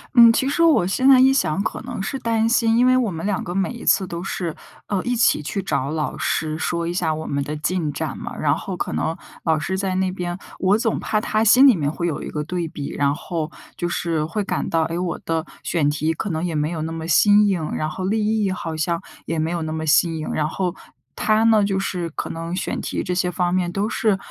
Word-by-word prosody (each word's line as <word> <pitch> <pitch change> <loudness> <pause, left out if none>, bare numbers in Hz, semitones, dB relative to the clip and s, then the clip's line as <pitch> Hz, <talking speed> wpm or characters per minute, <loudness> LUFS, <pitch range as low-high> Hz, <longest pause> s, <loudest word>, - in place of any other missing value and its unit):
嗯， 235 -1 +9
其 265 +3 +1
实 295 - 0
我 320 - +5
现 255 +8 +1
在 270 -1 +8
一 265 +1 +6
想 185 - +1
可 - - -3
能 240 -4 -5
是 270 +6 -3
担 225 -2 +1
心， 230 -1 +3
因 245 - +5
为 255 0 +5
我 245 -5 +1
们 165 0 -5
两 205 -2 0
个 175 - -5
每 195 +3 0
一 240 - -9
次 195 - +4
都 170 -1 -5
是， 175 -3 -3 0.3
呃， 195 -3 0
一 245 0 0
起 225 - +3
去 190 +7 -3
找 140 -7 -1
老 155 -1 -2
师 155 +1 -1
说 170 +1 -1
一 170 - -2
下 165 -3 0
我 160 - -6
们 140 0 -1
的 150 +2 -4
进 155 0 -1
展 - - -4
嘛。 - - -7
然 - - +2
后 - - -5
可 - - -3
能 120 - -1 0.3
老 160 -2 +2
师 180 +5 -2
在 190 -1 -1
那 185 0 +1
边， 175 -1 -4 0.2
我 195 +2 +3
总 225 -1 0
怕 215 -1 0
他 215 0 +1
心 250 +5 +7
里 255 - +6
面 145 -5 0
会 170 +3 -3
有 160 - -3
一 - - -6
个 150 -1 -3
对 175 +1 -3
比， 145 -2 -6
然 140 0 +1
后 160 -1 -4 0.3
就 175 - -1
是 165 -3 -1
会 200 +6 -2
感 - - -2
到， 165 -1 +2
哎， 165 +2 -2
我 180 -2 -2
的 165 -1 -1 0.2
选 155 -4 +1
题 155 +2 0
可 205 +6 -4
能 160 +1 -2
也 175 - -2
没 150 0 0
有 165 -2 -4
那 160 - -3
么 165 0 -5
新 205 +5 +5
颖， 175 -6 -1
然 155 - -1
后 185 +4 -5
立 215 +2 +1
意 195 - +1
好 165 -3 -4
像 170 +2 -1 0.2
也 165 -1 -2
没 160 +2 0
有 175 -1 -2
那 155 0 -3
么 160 0 -3
新 165 +2 +3
颖， 155 - -4
然 150 0 0
后 180 +1 -2 0.4
他 215 0 +2
呢 220 -2 +5
就 200 -1 0
是 180 -3 -2
可 - - -4
能 165 +2 -4
选 185 - -2
题 - - -3
这 180 - -2
些 180 0 +1
方 175 0 0
面 180 -1 0
都 200 +3 -1
是， 215 -2 +1
175 Hz, 275 characters per minute, -22 LUFS, 160-210 Hz, 0.4 s, 嗯